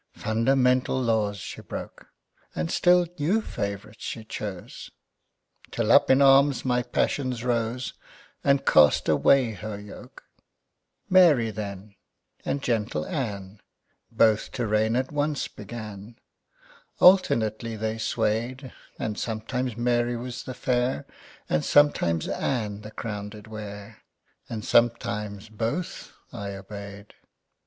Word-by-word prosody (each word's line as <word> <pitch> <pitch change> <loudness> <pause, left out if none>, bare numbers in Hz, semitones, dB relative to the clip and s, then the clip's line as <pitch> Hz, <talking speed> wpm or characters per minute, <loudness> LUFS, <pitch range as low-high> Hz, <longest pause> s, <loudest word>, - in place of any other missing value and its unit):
Fundamental 125 +3 +2
laws 110 -4 0
she - - -8
broke, - - -8 0.5
And 80 +1 -2
still 180 0 +4
new 175 +10 +2
favorites 100 - -5
she 115 - -5
chose, 100 -4 -7 0.8
Till - - 0
up - - +6
in 130 +1 +6
arms 135 0 +5
my 125 -1 +2
passions 125 0 -1
rose, 120 0 -1 0.5
And 140 0 +2
cast 75 -2 +5
away 130 -4 +4
her 105 0 -6
yoke. 105 -1 -12 0.8
Mary 155 -12 +5
then, 100 -1 -7 0.5
and 140 - -2
gentle 105 -10 -1
Ann 100 -7 -5 0.5
Both 110 -2 +2
to 120 - -2
reign 110 +1 +1
at 130 +1 -1
once 145 -1 -1
began. 105 0 -9 0.8
Alternately 115 - +4
they 110 +1 -3
sway'd; 115 +4 -2 0.2
And 105 -1 -3
sometimes 120 +2 -3
Mary 120 0 +1
was 125 +1 -6
the 130 - -6
Fair, 125 - 0 0.4
And 75 - 0
sometimes 85 - +3
Ann 105 -5 -2
the 105 - -9
Crown 105 -2 -5
did 105 0 -12
wear, 105 -1 -9 0.5
And 110 -2 -5
sometimes 105 -3 +1
Both 115 - -4 0.2
I 100 -1 -5
obey'd. 100 +1 -10
110 Hz, 115 wpm, -26 LUFS, 105-125 Hz, 0.8 s, up